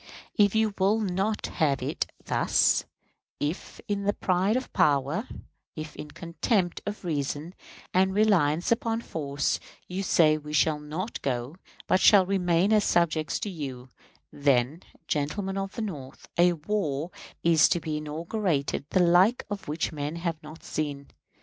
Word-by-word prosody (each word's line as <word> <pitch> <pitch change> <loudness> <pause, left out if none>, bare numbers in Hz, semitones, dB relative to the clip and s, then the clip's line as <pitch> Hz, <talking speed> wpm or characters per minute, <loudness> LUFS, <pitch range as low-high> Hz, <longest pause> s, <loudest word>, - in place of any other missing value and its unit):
If 205 -1 +4
you 220 -1 +2
will 200 +4 +3
not 200 +1 -1
have 145 -5 0
it - - -2 0.2
thus - - +2 0.5
if 150 +6 -4
in 205 -1 -1
the 205 - +2
pride 190 +5 +1
of 255 - -5
power, 145 - +2 0.5
if 155 -1 -7
in 150 - -8
contempt 175 +3 -1
of 205 -2 -5
reason, 150 +1 -2 0.4
and 190 +1 +3
reliance 185 -6 +2
upon 230 0 +1
force, 145 -7 -2 0.3
you 185 +2 -3
say 155 -5 +4
we 150 0 -8
shall 150 0 +3
not 160 +9 -5
go, 130 +4 -3 0.3
but 185 - +3
shall 195 -3 +7
remain 180 +1 +2
as 210 -1 +4
subjects 160 -4 +1
to 210 - -2
you 130 -6 -6 0.4
then, 140 +2 +1 0.3
gentlemen 190 +7 -1
of 195 0 -4
the 230 - -3
North, 140 -10 -7
a 175 +1 +5
war 165 -2 -2 0.3
is 165 -2 +5
to 175 - +2
be 155 -2 -3
inaugurated 155 -1 -2
the 185 - +3
like 180 +8 +4
of 200 -1 -5
which 155 +2 -2
men 150 0 -4
have 170 -2 -3
not 155 +2 -12
seen. 145 -2 -4
170 Hz, 150 wpm, -27 LUFS, 150-195 Hz, 0.5 s, shall